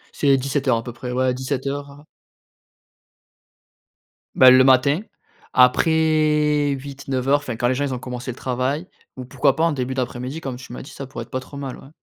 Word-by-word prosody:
C'est 140 Hz, -2 st, +3 dB
17:00 135 Hz, -2 st, 0 dB
à 115 Hz, -, -4 dB
peu 120 Hz, -, -7 dB
près, 125 Hz, +1 st, -7 dB
ouais 130 Hz, +1 st, 0 dB
à 125 Hz, -, +2 dB
17:00, 140 Hz, +2 st, -3 dB
heu 145 Hz, +1 st, -15 dB, 2.3 s
Ben, 130 Hz, -1 st, +8 dB
le 130 Hz, 0 st, +7 dB
matin, 135 Hz, +5 st, +4 dB, 0.5 s
après 150 Hz, +2 st, +3 dB
08-09:00, 135 Hz, 0 st, -1 dB
enfin, 135 Hz, -5 st, -6 dB
quand 120 Hz, +2 st, 0 dB
les 130 Hz, -, +1 dB
gens 145 Hz, -, -1 dB
ils 135 Hz, -, -3 dB
ont 125 Hz, -, -4 dB
commencé 125 Hz, 0 st, -6 dB
le -, -, -10 dB
travail. 130 Hz, +8 st, -2 dB, 0.3 s
Ou 130 Hz, -, -7 dB
pourquoi 135 Hz, +2 st, +1 dB
pas 160 Hz, -, 0 dB
en 165 Hz, -, +3 dB
début 130 Hz, -1 st, -3 dB
d'après-mid 125 Hz, 0 st, -4 dB
?i 160 Hz, -, -7 dB
Comme 135 Hz, -4 st, -5 dB
tu 125 Hz, -1 st, -11 dB
m'as -, -, -7 dB
dit, 135 Hz, -, -11 dB
ça 140 Hz, -, -8 dB
pourrait 120 Hz, -3 st, -7 dB
être -, -, -28 dB
pas 130 Hz, -, -3 dB
trop 130 Hz, +2 st, -13 dB
mal, 135 Hz, -2 st, -6 dB
ouais. 135 Hz, -, -14 dB
130 Hz, 205 wpm, -21 LUFS, 125-145 Hz, 2.3 s, Ben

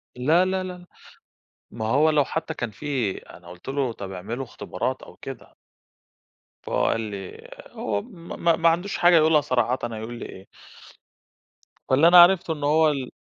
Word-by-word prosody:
لا، 155 Hz, +9 st, +3 dB
لا، 190 Hz, 0 st, -1 dB
لا، 180 Hz, -1 st, -8 dB, 0.9 s
ما 110 Hz, 0 st, -5 dB
هو 145 Hz, +8 st, +3 dB
لو 150 Hz, -2 st, +3 dB
حتى 160 Hz, +2 st, -4 dB
كان 120 Hz, -7 st, -5 dB
في 125 Hz, -4 st, -3 dB
أنا 90 Hz, -, -14 dB
قُلت 90 Hz, 0 st, -14 dB
له 135 Hz, -2 st, -1 dB
طَب 100 Hz, -3 st, -8 dB
اعملوا 105 Hz, +8 st, -5 dB
اختبارات 130 Hz, +1 st, -4 dB
أو -, -, -14 dB
كده. 135 Hz, -3 st, -10 dB, 1.1 s
فهو -, -, -1 dB
قال 115 Hz, -, +1 dB
لي 100 Hz, -4 st, -6 dB
آآ -, -, -14 dB
هو 100 Hz, -2 st, -2 dB
م 170 Hz, -, -11 dB
ما 170 Hz, -1 st, +4 dB
ما 165 Hz, 0 st, +3 dB
عندوش 175 Hz, +4 st, -1 dB
حاجة 175 Hz, 0 st, +5 dB
يقولها 155 Hz, -1 st, +4 dB
صراحةً، 125 Hz, -2 st, 0 dB
هيقول 110 Hz, +2 st, -6 dB
لي -, -, -6 dB
إيه؟ 95 Hz, -, -12 dB, 1.4 s
فاللي 140 Hz, +5 st, +5 dB
أنا 175 Hz, +1 st, +7 dB
عرفته 175 Hz, -2 st, +4 dB
إن 150 Hz, -2 st, -8 dB
هو 155 Hz, +2 st, +4 dB
ال 135 Hz, -4 st, -3 dB
140 Hz, 170 wpm, -24 LUFS, 115-165 Hz, 1.4 s, أنا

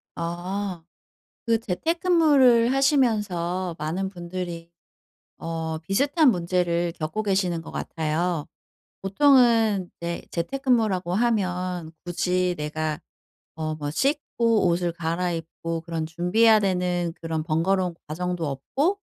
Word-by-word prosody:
아. 175 Hz, +1 st, -4 dB, 0.6 s
그 230 Hz, -1 st, +3 dB
재택근무를 275 Hz, -, +3 dB
하시면서 210 Hz, -, +1 dB
많은 175 Hz, +6 st, -2 dB
분들이 175 Hz, -2 st, -6 dB, 0.7 s
어 160 Hz, -1 st, -4 dB
비슷한 275 Hz, -, +3 dB
문제를 175 Hz, -2 st, 0 dB
겪고 160 Hz, +7 st, -2 dB
계시는 190 Hz, -4 st, 0 dB
것 -, -, -10 dB
같아요. 160 Hz, 0 st, -2 dB, 0.6 s
보통은 225 Hz, -3 st, +4 dB
네 170 Hz, 0 st, -4 dB
재택근무라고 210 Hz, -3 st, 0 dB
하면 185 Hz, -7 st, 0 dB
'굳이 180 Hz, +1 st, 0 dB
내가 155 Hz, 0 st, -3 dB, 0.6 s
어 155 Hz, -1 st, -3 dB
뭐 145 Hz, -1 st, -4 dB
씻고 235 Hz, -, +1 dB
옷을 170 Hz, 0 st, 0 dB
갈아입고 165 Hz, -1 st, -3 dB
그런 165 Hz, -1 st, -3 dB
준비해야 215 Hz, +7 st, +4 dB
되는 180 Hz, -3 st, 0 dB
그런 160 Hz, -1 st, -2 dB
번거로운 180 Hz, +3 st, +1 dB
과정도 175 Hz, 0 st, -2 dB
없고 280 Hz, -, -1 dB
180 Hz, 240 characters per minute, -25 LUFS, 165-220 Hz, 0.7 s, 보통은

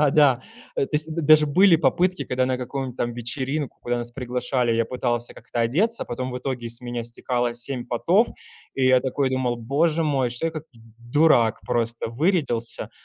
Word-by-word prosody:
да 150 Hz, -2 st, +4 dB
да. 135 Hz, -4 st, +4 dB, 0.3 s
Э, -, -, +1 dB
то -, -, -22 dB
есть 155 Hz, +1 st, -2 dB
д 165 Hz, -, -2 dB
даже 155 Hz, 0 st, +6 dB
были 180 Hz, +4 st, +5 dB
попытки, 175 Hz, +5 st, +1 dB
когда 130 Hz, 0 st, 0 dB
на 130 Hz, -1 st, -1 dB
каком 130 Hz, 0 st, -4 dB
там 120 Hz, -1 st, -2 dB
вечеринку, 130 Hz, +4 st, -3 dB
куда 120 Hz, 0 st, -1 dB
нас 120 Hz, 0 st, -4 dB
приглашали, 125 Hz, -1 st, -1 dB
я 115 Hz, 0 st, +2 dB
пытался 120 Hz, -1 st, -2 dB
как-то 120 Hz, -, -5 dB
одеться, 185 Hz, -, +1 dB
потом 130 Hz, +2 st, -4 dB
в 125 Hz, -, -4 dB
итоге 125 Hz, -2 st, -4 dB
с 120 Hz, +1 st, -6 dB
меня 120 Hz, -1 st, -4 dB
стекало 120 Hz, 0 st, -2 dB
7 120 Hz, +1 st, -5 dB
потов, 180 Hz, -, +2 dB, 0.5 s
и 135 Hz, -, +1 dB
я 130 Hz, 0 st, +5 dB
такой 130 Hz, +1 st, -1 dB
думал: 130 Hz, -2 st, 0 dB
"Боже 150 Hz, +8 st, +1 dB
мой, 135 Hz, -5 st, +1 dB
что 125 Hz, +7 st, -3 dB
я, 165 Hz, -, -2 dB
как 155 Hz, -1 st, -6 dB
д 115 Hz, -, -18 dB, 0.3 s
дурак, 120 Hz, -8 st, +4 dB
просто 115 Hz, -1 st, -1 dB
вырядился". 135 Hz, -5 st, -1 dB
130 Hz, 195 wpm, -24 LUFS, 120-150 Hz, 0.5 s, даже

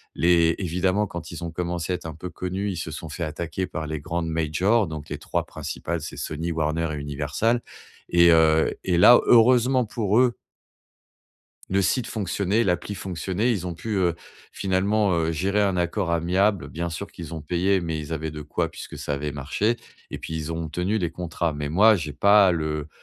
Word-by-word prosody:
Les 85 Hz, -1 st, +4 dB
évidemment, 95 Hz, +3 st, +1 dB
quand 85 Hz, -3 st, -7 dB
ils 85 Hz, 0 st, -7 dB
ont 85 Hz, -, -4 dB
commencé 85 Hz, 0 st, -2 dB
à -, -, +1 dB
être -, -, -16 dB
un 80 Hz, -, -7 dB
peu 90 Hz, +3 st, -7 dB
connus, 95 Hz, +3 st, -3 dB
ils 90 Hz, -, -5 dB
se 80 Hz, -, -4 dB
sont 80 Hz, +2 st, -7 dB
fait 85 Hz, +4 st, -5 dB
attaquer 85 Hz, +3 st, -3 dB
par 80 Hz, -1 st, -5 dB
les 80 Hz, 0 st, -3 dB
grandes 85 Hz, +2 st, -3 dB
majors, 85 Hz, +7 st, +1 dB
donc 75 Hz, -1 st, -7 dB
les -, -, -4 dB
3 -, -, -2 dB
principales, -, -, -5 dB
c'est -, -, -7 dB
Sony, 80 Hz, +3 st, -3 dB
Warner 80 Hz, +1 st, -1 dB
et -, -, -4 dB
Universal. 75 Hz, -, -1 dB, 0.5 s
Et 85 Hz, 0 st, +6 dB
heu 80 Hz, -1 st, +4 dB
et 90 Hz, -2 st, +1 dB
là, 120 Hz, +8 st, +8 dB
heureusement 125 Hz, +2 st, +5 dB
pour 105 Hz, -1 st, 0 dB
eux 125 Hz, -2 st, +3 dB, 1.4 s
le 95 Hz, +1 st, +2 dB
site 110 Hz, +5 st, +1 dB
fonctionnait, 100 Hz, +1 st, 0 dB
l'appli 95 Hz, 0 st, -1 dB
fonctionnait. 95 Hz, +5 st, -2 dB
Ils 95 Hz, -6 st, -1 dB
ont 90 Hz, -, -4 dB
pu, 105 Hz, +5 st, -4 dB
heu, 90 Hz, -3 st, +2 dB, 0.4 s
finalement, 100 Hz, +1 st, +1 dB
heu, 80 Hz, -1 st, 0 dB
gérer 100 Hz, +6 st, +1 dB
un 95 Hz, -2 st, +1 dB
accord 90 Hz, +1 st, -1 dB
amiable, 90 Hz, +3 st, +1 dB
bien 85 Hz, +1 st, -4 dB
sûr 85 Hz, +5 st, -5 dB
qu'ils 85 Hz, -4 st, -9 dB
ont 80 Hz, -, -5 dB
payé 90 Hz, +5 st, +1 dB
mais 80 Hz, -2 st, -3 dB
ils 75 Hz, +1 st, -6 dB
avaient 80 Hz, 0 st, -3 dB
de 75 Hz, 0 st, -7 dB
quoi 75 Hz, -, -2 dB
puisque -, -, -9 dB
ça 70 Hz, -, -2 dB
avait 75 Hz, +1 st, -3 dB
marché. 75 Hz, -, -1 dB, 0.3 s
Et -, -, -5 dB
puis, 80 Hz, -, -6 dB
ils 80 Hz, 0 st, -3 dB
ont 80 Hz, 0 st, -4 dB
tenu 90 Hz, +7 st, -1 dB
les 85 Hz, -5 st, -1 dB
contrats, 85 Hz, -1 st, -2 dB
mais 75 Hz, 0 st, -3 dB
moi, 105 Hz, +8 st, +6 dB
j'ai 75 Hz, -5 st, -4 dB
pas 100 Hz, 0 st, +5 dB
le 75 Hz, -2 st, -2 dB
85 Hz, 200 wpm, -24 LUFS, 80-100 Hz, 1.4 s, là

